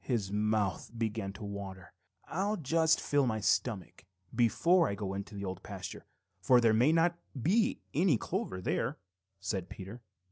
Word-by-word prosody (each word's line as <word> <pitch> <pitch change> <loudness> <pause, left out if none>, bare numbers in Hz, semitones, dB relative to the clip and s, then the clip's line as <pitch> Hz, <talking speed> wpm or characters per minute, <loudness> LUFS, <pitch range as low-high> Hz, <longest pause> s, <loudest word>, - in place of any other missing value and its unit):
His 110 -7 -1
mouth 105 -3 0
began 110 -3 -2
to 105 - -9
water. 100 -2 -7 0.3
"I'll 200 +5 -1
just 160 +1 +3
fill 145 -2 +2
my 110 -2 0
stomach 95 -5 -1 0.3
before 165 - +4
I 100 - -2
go 100 -2 -4
into 100 +1 -6
the 100 0 -4
Old 95 -1 -5
Pasture, - - -7 0.3
for 125 -1 +6
there 115 -2 +4
may 120 +7 +5
not 170 +1 +3 0.2
be 210 - +2
any 160 -4 +4
clover 95 -3 -3
there," 120 +9 -1 0.4
said 95 -2 -3
Peter. 100 +6 -8
110 Hz, 155 wpm, -32 LUFS, 100-150 Hz, 0.4 s, for